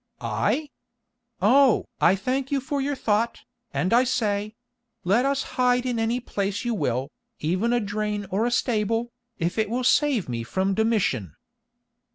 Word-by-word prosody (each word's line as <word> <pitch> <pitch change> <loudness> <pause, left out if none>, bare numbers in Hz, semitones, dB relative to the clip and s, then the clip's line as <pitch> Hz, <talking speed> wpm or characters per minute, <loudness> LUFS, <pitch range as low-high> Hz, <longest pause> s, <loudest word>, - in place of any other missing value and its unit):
"I? 300 -2 -1 0.7
Oh! 260 +3 +5
I 190 - +5
thank 255 +7 -2
you 280 - +2
for 275 +1 -2
your 285 +1 -1
thought, 225 -1 0 0.3
and 185 - 0
I 245 +2 +6
say—let 225 0 -2
us 275 0 0 0.2
hide 250 0 +3
in 245 -2 -1
any 225 +2 0
place 205 -2 -3
you 240 - 0
will, 130 - -1 0.3
even 185 +9 0
a 245 - +3
drain 210 -1 -2
or 210 +5 +1
a - - -1
stable, 230 0 0 0.3
if 175 +4 -1
it 215 -1 +1
will 250 +3 -1
save 270 - +3
me 120 -2 -3
from 190 +12 -1
Domitian." 210 - 0
225 Hz, 155 wpm, -25 LUFS, 200-250 Hz, 0.7 s, I